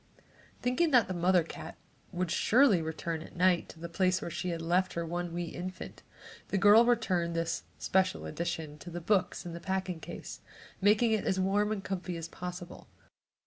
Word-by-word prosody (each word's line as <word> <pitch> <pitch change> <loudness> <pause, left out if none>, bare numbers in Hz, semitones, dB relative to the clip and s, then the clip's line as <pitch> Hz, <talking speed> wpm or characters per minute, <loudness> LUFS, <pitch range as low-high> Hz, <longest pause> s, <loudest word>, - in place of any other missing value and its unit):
Thinking 255 +7 +2
that 250 -6 +5
the 185 - -3
mother 180 0 +3
cat 160 0 -9 0.3
would 180 -1 -2
surely 235 -7 +4
return 160 +1 -3
at - - -12
night 180 -1 +3
to - - -12
the 170 - -5
place 185 +2 +1
where 170 - -5
she 180 +2 -3
had 170 -1 -2
left 180 +3 +1
her 170 0 -2
one 175 +1 -3
wee 175 +1 -3
infant, 185 +2 -7 0.5
the 200 - -1
girl 205 +4 +7
returned 185 -8 +1
this 165 0 -2
"special 185 - +1
edition" 155 - -4
to 175 - -9
the 175 0 -5
books 185 +2 0
in 170 - -6
the 170 - -6
packing 190 -1 -2
case, - - -8 0.4
making 210 +3 +4
it 215 -2 +1
as 190 - +1
warm 205 +3 +2
and 205 -3 -3
comfy 180 -2 -4
as 165 0 -5
possible. 180 0 -8
180 Hz, 185 wpm, -31 LUFS, 170-195 Hz, 0.5 s, girl